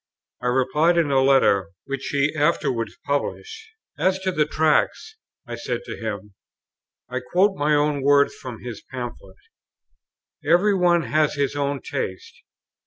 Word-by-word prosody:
I 125 - -2
replied 130 +7 +2
in 160 -4 +2
a 135 -1 +4
letter, 100 -8 +3
which 140 -1 -5
he 140 +1 +1
afterwards 145 -6 0
published. 445 - -3 0.3
"As 185 0 +2
to 190 0 0
the 150 -4 +1
Tracts," 160 - +1 0.3
I - - -6
said - - -3
to - - -7
him 105 -3 -6 0.7
(I - - -3
quote 195 +2 +1
my 150 -1 +2
own 145 -1 +1
words 140 +1 +4
from 125 -3 -9
his 120 -4 -7
Pamphlet), 120 -7 -7 1.1
"every 175 +7 +3
one 175 -3 +3
has 155 -1 +1
his 140 0 -1
own 140 -1 -1
taste. 460 +1 -5
145 Hz, 145 wpm, -23 LUFS, 130-170 Hz, 1.1 s, a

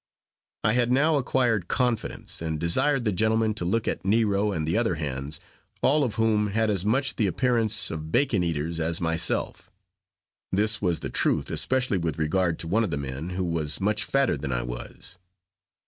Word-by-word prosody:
I 110 - +3
had 120 0 +1
now 150 +4 +3
acquired 120 -7 0
confidence, 125 -8 -1
and 80 -2 -3
desired 120 - +2
the 105 - +2
gentlemen 110 +3 +1
to 105 -5 -3
look 110 +5 0
at - - -2
Nero 105 0 +1
and 80 -5 -3
the 80 - 0
other 115 0 +1
hands, 70 0 -4 0.4
all 150 +2 +3
of 115 -5 -2
whom 110 -2 +2
has 110 +2 0
as 95 -3 +2
much 130 +5 +1
the 110 - +2
appearance 115 0 +1
of 80 0 -6
bacon 120 - +2
eaters 85 0 -2
as 80 +1 0
myself. 80 -1 0 0.8
This 105 +4 +2
was 90 -4 0
the - - -5
truth, - - +1
especially 130 -7 +2
with 80 -3 -3
regard 85 +2 0
to 80 - -5
one 110 +7 +2
of 105 - -2
the 70 - -2
men, 70 +4 -5
who 90 +1 -3
was 80 -3 0
much 105 +3 +1
fatter 135 - +1
than 70 -1 -5
I - - -1
was. - - -6
100 Hz, 185 wpm, -25 LUFS, 80-115 Hz, 0.8 s, I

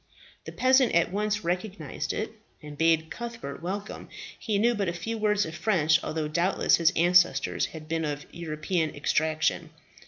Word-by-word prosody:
The - - -7
peasant 260 -3 +3
at 170 0 +3
once 210 +1 -1
recognized 175 -4 -3
it, 215 - -3 0.3
and 150 -1 -10
bade 160 +1 +2
Cuthbert 235 - -6
welcome. 200 +4 -5 0.3
He 210 -2 -1
knew 235 +4 +3
but 205 -4 -1
a - - -3
few 200 +7 -4
words 210 -1 +1
of 160 - -7
French, 160 -2 +2
although 155 -1 -2
doubtless 170 +5 +2
his 165 0 +4
ancestors 180 +1 +3
had 155 -1 -10
been 165 0 -1
of 145 -1 -4
European 160 0 -2
extraction. 155 +2 0
170 Hz, 160 wpm, -27 LUFS, 160-210 Hz, 0.3 s, his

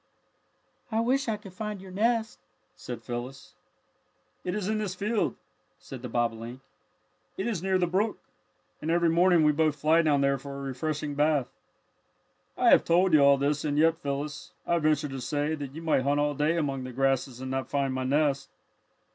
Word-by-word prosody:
"I 220 - +1
wish 255 +4 +1
I 215 - 0
could 200 -3 -13
find 210 +1 -5
your 190 0 -11
nest," 225 +3 0 0.4
said - - -8
Phyllis. 125 +3 -7 0.9
"It 180 +1 -2
is 205 -3 -2
in 215 0 0
this 200 -3 -3
field," 200 - -1 0.4
said 130 -3 -10
the 125 - -6
bobolink. 115 +1 -2 0.8
"It 190 - -2
is 220 -8 -2
near 190 0 +1
the 180 - +2
brook, 195 +5 0 0.6
and 155 - -3
every 170 0 +3
morning 175 0 +4
we 150 - +5
both 155 0 +1
fly 155 +3 +3
down 150 -3 +2
there 140 0 +2
for 140 +1 -8
a - - -6
refreshing 145 +2 -3
bath. 145 -2 +1 1.1
"I - - +4
have - - +6
told 175 +1 +3
you 155 - +7
all 140 0 +6
this, 140 +1 0
and 145 -1 -1
yet, 165 +2 +3
Phyllis, 145 0 -4
I 170 - +1
venture 155 -1 +1
to 135 -2 -6
say 145 +4 -1
that 145 -3 -6
you 165 - -7
might 160 -5 +2
hunt 140 +2 +1
all 145 0 +1
day 150 +4 +1
among 140 -5 -1
the 130 - -6
grasses 135 -1 0
and 130 0 -5
not 135 0 -3
find 140 -2 0
my 130 0 -2
nest. 140 +1 +1
150 Hz, 190 wpm, -28 LUFS, 135-180 Hz, 1.1 s, you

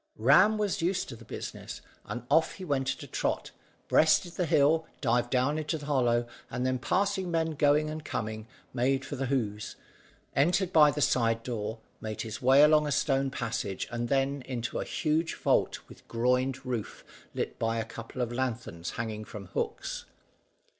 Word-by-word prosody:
Ram 180 - +5
was 205 -5 0
used 180 +3 0
to 125 - -6
the - - -13
business, - - -7 0.3
and 125 - -5 0.3
he 190 - -7
went 135 -4 0
off - - -1
at - - -9
a - - -9
trot, - - -2 0.4
breasted 160 +3 +4
the 180 -1 -1
hill, 160 +1 +3
dived 120 -2 +1
down 130 +5 +1
into 155 +1 -2
the 150 - -9
hollow, 120 -5 +2 0.2
and 125 +1 -2
then 130 0 0
passing 190 +8 0
men 165 -1 +1
going 150 0 +3
and 155 0 -5
coming, 110 -5 -4 0.3
made 135 +2 +1
for 145 - -5
the 135 0 -2
Hoze, 110 -6 -2 0.6
entered 180 +6 +2
by 150 -2 +8
the 150 +1 -2
side 115 -4 +2
door, 110 -2 -3 0.2
made 110 -1 -4
his 110 +3 -6
way 135 +3 +7
along 150 0 +5
a - - -1
stone 135 -1 +1
passage, 115 -6 -3
and 120 0 -2
then 140 +1 +1
down 130 - -13
into 120 -2 -3
a - - -3
huge 160 +2 0
vault - - +1
with - - -16
groined 125 +3 0
roof 120 -4 -4 0.3
lit - - -3
by 115 0 0
a 115 - -1
couple 115 +2 -5
of 120 - -3
lanthorns 120 -9 -3
hanging 110 -2 -3
from 105 -2 -9
hooks. - - -3
130 Hz, 180 wpm, -29 LUFS, 120-150 Hz, 0.6 s, by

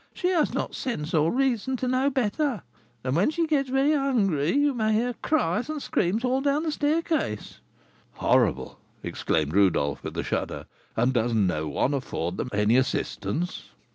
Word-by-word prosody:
she 360 - 0
has 345 -4 +2
not - - -3
sense 170 - -4
or 160 0 +3
reason 260 -1 0
to 255 - -2
know 255 +2 +2
better, 260 - -1 0.4
and 130 +1 -1
when 180 - +3
she 330 +2 0
gets 285 -4 0
very 270 +3 +3
hungry 205 - +1
you 290 0 +3
may 220 -3 0
hear 240 +3 +1
cries 245 - 0
and 310 -1 -3
screams 220 -2 0
all 260 +2 +1
down 285 +2 +1
the 320 - -1
staircase." 300 - -1 0.5
"Horrible!" - - +1 0.2
exclaimed 75 -1 -1
Rodolph, 90 -8 +2
with - - -6
a - - -1
shudder; - - -3 0.3
"and 120 +3 +2
does 120 -1 +1
no 90 -7 +1
one 100 - 0
afford 95 -10 -3
them 125 - -3
any 105 +3 +3
assistance?" 130 - -2
220 Hz, 170 wpm, -26 LUFS, -, 0.5 s, or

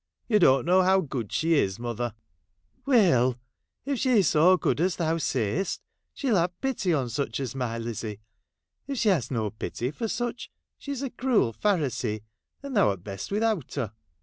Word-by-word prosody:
You 215 -3 +4
don't 135 -7 +5
know 185 +2 +5
how 190 +1 +4
good 130 - -4
she 165 +1 +1
is, 95 -11 +2
mother! 120 -1 -3 0.2
' 80 +3 -48
' 260 - -41
Will, 280 - +1
Will! 130 - +4 0.5
if 275 -3 -1
she 245 -7 +4
's - - +3
so 175 +5 +5
good 160 - 0
as 180 +1 +1
thou 165 -1 0
say'st, 130 - -1 0.4
she 275 - -2
'11 200 -7 +4
have 175 +1 -2
pity 260 -9 0
on 140 -6 +1
such 120 0 -2
as 130 -5 -3
my 125 -4 -3
Lizzie. 115 -2 -5 0.7
If 275 -1 -3
she 220 - +3
has 165 - +1
no 110 -5 -1
pity 120 +3 -4
for 225 +9 -3
such, 240 +3 -3 0.3
she 285 - -6
's 270 - -5
a 265 - -3
cruel 240 - +1
Pharisee, 130 - 0 0.4
and 280 -2 -5
thou 200 - +4
'rt 95 -3 -7
best 100 -1 -6
without 210 - 0
her.' 120 -8 -2
155 Hz, 200 wpm, -27 LUFS, -, 0.7 s, don't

